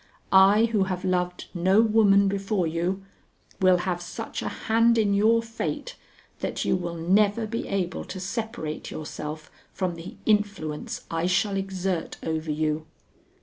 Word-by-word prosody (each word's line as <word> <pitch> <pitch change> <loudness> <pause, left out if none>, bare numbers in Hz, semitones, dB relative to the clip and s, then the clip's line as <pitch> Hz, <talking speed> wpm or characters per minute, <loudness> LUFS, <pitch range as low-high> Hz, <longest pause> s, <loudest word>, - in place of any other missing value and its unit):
I 195 +3 +7
who 215 -4 +1
have 185 -1 -3
loved 180 -1 -1
no 190 +3 +3
woman 210 -3 +5
before 195 -1 0
you, 175 +4 -2 0.5
will 185 -1 +5
have 175 0 -2
such 175 - -6
a - - -3
hand 230 +1 +2
in 210 -2 +3
your 225 +3 +4
fate 230 - -4 0.4
that - - -3
you - - +2
will 175 -2 -3
never 200 +6 +2
be 230 +2 -4
able 185 -3 -2
to 190 - -7
separate 195 -5 -4
yourself 155 0 -6 0.2
from 185 -2 -2
the 170 +1 -9
influence 200 -8 -1
I 165 +1 0
shall 195 +2 +1
exert 190 -3 -2
over 160 0 -2
you. 155 +1 -1
190 Hz, 145 wpm, -26 LUFS, 175-210 Hz, 0.5 s, I